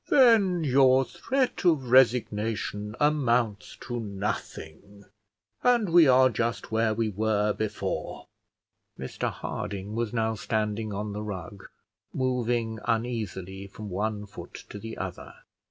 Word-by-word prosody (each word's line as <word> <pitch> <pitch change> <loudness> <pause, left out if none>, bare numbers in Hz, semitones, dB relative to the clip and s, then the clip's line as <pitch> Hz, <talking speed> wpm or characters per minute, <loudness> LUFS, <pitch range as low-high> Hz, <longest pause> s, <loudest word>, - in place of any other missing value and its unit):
"Then 220 - +5
your 135 -1 +5
threat 260 - -1
of 150 -9 +2
resignation 110 -4 +2
amounts 125 -8 +1
to 120 -1 -4
nothing, 100 -2 -6 0.6
and 240 -5 +3
we 165 -2 +7
are 130 0 +6
just 115 -1 -2
where 110 0 +1
we 115 -1 0
were 105 0 +1
before." 110 0 -4 0.7
Mr 65 - -3
Harding 100 +1 -5
was 115 -1 -2
now 110 -2 0
standing 110 -1 -2
on 105 +1 -4
the 105 - -4
rug, 100 -2 -7 0.5
moving 120 -3 0
uneasily 105 -5 -3
from 105 +1 -9
one 105 +2 -2
foot 100 - -10
to 105 - -7
the 115 +1 -7
other. 95 -2 -6
110 Hz, 120 wpm, -27 LUFS, 105-130 Hz, 0.7 s, we